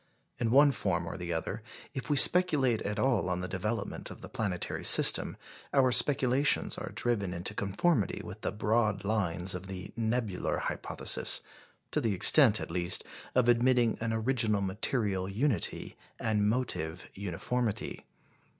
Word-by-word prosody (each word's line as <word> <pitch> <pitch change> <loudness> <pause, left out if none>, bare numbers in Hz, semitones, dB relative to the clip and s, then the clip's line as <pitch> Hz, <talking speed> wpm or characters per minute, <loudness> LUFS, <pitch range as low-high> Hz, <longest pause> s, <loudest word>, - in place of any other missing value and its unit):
In 115 - 0
one 140 +4 +5
form 90 -9 -2
or 80 - -6
the 85 -1 -6
other, 85 +6 -4 0.3
if 135 0 -4
we 145 - +1
speculate 140 -8 +3
at 105 0 -4
all 110 -6 +1
on 90 0 -2
the 90 - -4
development 100 +3 -4
of - - -11
the - - -10
planetary 100 -5 -3
system, - - +5 0.4
our 130 -2 +4
speculations 130 +2 +3
are - - -7
driven 100 -7 -1
into 90 +4 -3
conformity 105 - -1
with 105 +3 -10
the - - -2
broad 105 -2 0
lines 95 -3 0
of 90 +1 -7
the 95 0 -8
Nebular 110 -4 -2
Hypothesis - - 0 0.5
to - - 0
the 110 -4 -1
extent, 115 - +6
at - - -7
least, 85 0 +3 0.3
of 125 -2 +3
admitting 120 -1 +2
an 115 0 -2
original 110 -2 0
material 100 -1 -2
unity 110 - -1 0.2
and 105 -2 0
motive 95 -9 -3
uniformity. 100 +4 -4
110 Hz, 150 wpm, -29 LUFS, 95-125 Hz, 0.5 s, extent